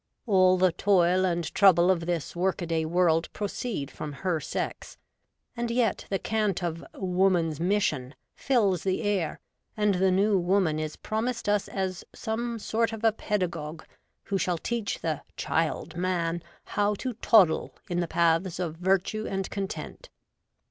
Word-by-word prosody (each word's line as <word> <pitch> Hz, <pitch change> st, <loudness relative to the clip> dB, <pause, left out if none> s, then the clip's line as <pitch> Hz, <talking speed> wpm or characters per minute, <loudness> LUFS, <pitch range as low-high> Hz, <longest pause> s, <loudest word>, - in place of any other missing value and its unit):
All 185 Hz, -4 st, +5 dB
the 185 Hz, 0 st, +4 dB
toil 185 Hz, 0 st, +3 dB
and 175 Hz, -2 st, 0 dB
trouble 185 Hz, -2 st, +6 dB
of 170 Hz, -2 st, -1 dB
this 170 Hz, -3 st, -2 dB
work 180 Hz, +1 st, 0 dB
a -, -, -2 dB
day 165 Hz, -1 st, 0 dB
world 165 Hz, -1 st, +2 dB
proceed 205 Hz, -, -3 dB
from 150 Hz, -, -6 dB
her 170 Hz, +3 st, -1 dB
sex; 145 Hz, -, -5 dB, 0.6 s
and 235 Hz, 0 st, -2 dB
yet 235 Hz, -3 st, 0 dB
the 195 Hz, -, +1 dB
cant 210 Hz, -3 st, -1 dB
of 165 Hz, -1 st, -3 dB
' -, -, -43 dB
Woman 180 Hz, -3 st, +2 dB
s 150 Hz, -, -8 dB
Mission 165 Hz, -8 st, 0 dB
' -, -, -53 dB
flls 200 Hz, -9 st, +3 dB
the 190 Hz, +3 st, -1 dB
air, 195 Hz, -7 st, -1 dB, 0.4 s
and 210 Hz, -1 st, +3 dB
the 190 Hz, +1 st, +2 dB
New 195 Hz, +2 st, +3 dB
Woman 175 Hz, -3 st, +2 dB
is 155 Hz, -1 st, -4 dB
promised 230 Hz, +2 st, -3 dB
us 205 Hz, -1 st, +1 dB
as 190 Hz, -2 st, -3 dB
some 235 Hz, +1 st, -3 dB
sort 225 Hz, +1 st, 0 dB
of 225 Hz, 0 st, -7 dB
a 225 Hz, -, +5 dB
pedagogue 175 Hz, -7 st, -3 dB, 0.4 s
who 195 Hz, -1 st, -1 dB
shall 180 Hz, -2 st, 0 dB
teach 230 Hz, +3 st, -3 dB
the 155 Hz, -3 st, -2 dB
' -, -, -47 dB
Child 160 Hz, 0 st, -1 dB
Man 175 Hz, -1 st, -1 dB
' -, -, -33 dB
how 205 Hz, 0 st, +2 dB
to 255 Hz, +4 st, -4 dB
toddle 205 Hz, -7 st, +4 dB
in 175 Hz, -1 st, -1 dB
the 175 Hz, -, 0 dB
paths 170 Hz, +2 st, +1 dB
of 165 Hz, -3 st, -3 dB
virtue 195 Hz, +4 st, 0 dB
and 195 Hz, -1 st, -2 dB
content. 200 Hz, -, -5 dB
185 Hz, 170 wpm, -27 LUFS, 170-205 Hz, 0.6 s, trouble